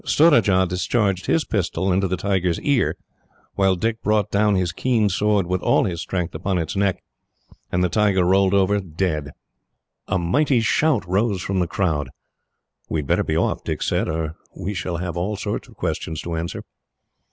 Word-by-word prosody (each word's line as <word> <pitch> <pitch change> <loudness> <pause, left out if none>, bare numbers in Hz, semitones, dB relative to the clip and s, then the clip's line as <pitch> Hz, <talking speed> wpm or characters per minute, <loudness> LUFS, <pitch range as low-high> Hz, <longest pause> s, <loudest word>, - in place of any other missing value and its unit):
Surajah 110 - +4
discharged 95 +2 0
his 165 - +2
pistol 95 -1 -1
into 95 +1 +1
its 95 -2 0
ear, 140 -4 +1 0.6
while 95 -1 +2
Dick 115 +4 -2
brought 105 -2 +1
down 105 0 +3
his 90 -2 0
keen 110 +2 +1
sword, 105 0 +1
with 90 +1 -1
all - - +3
his 85 -4 -2
strength, 90 -1 -3
upon 95 -1 -1
its 85 +1 -3
neck; 100 -1 0 0.7
and 90 +1 +1
the - - +3
tiger 100 -1 +2
rolled 95 +1 +3
over, 100 +1 +3
dead. 80 -4 -2 0.8
A 95 - +1
mighty 120 - +2
shout 125 - +2
rose 95 0 0
from 95 -1 -1
the 90 - +1
crowd. 80 - -1 0.8
"We 80 - 0
had - - -8
better - - +3
be - - -1
off," - - 0
Dick - - -3
said, - - 0
"or 80 0 -3 0.2
we 100 +3 -3
shall 90 -2 -3
have 90 -1 -4
all 95 +5 -2
sorts 105 0 -4
of - - -17
questions 80 -1 -3
to 85 -1 -4
answer." 85 +1 -4
95 Hz, 175 wpm, -22 LUFS, 90-105 Hz, 0.8 s, Surajah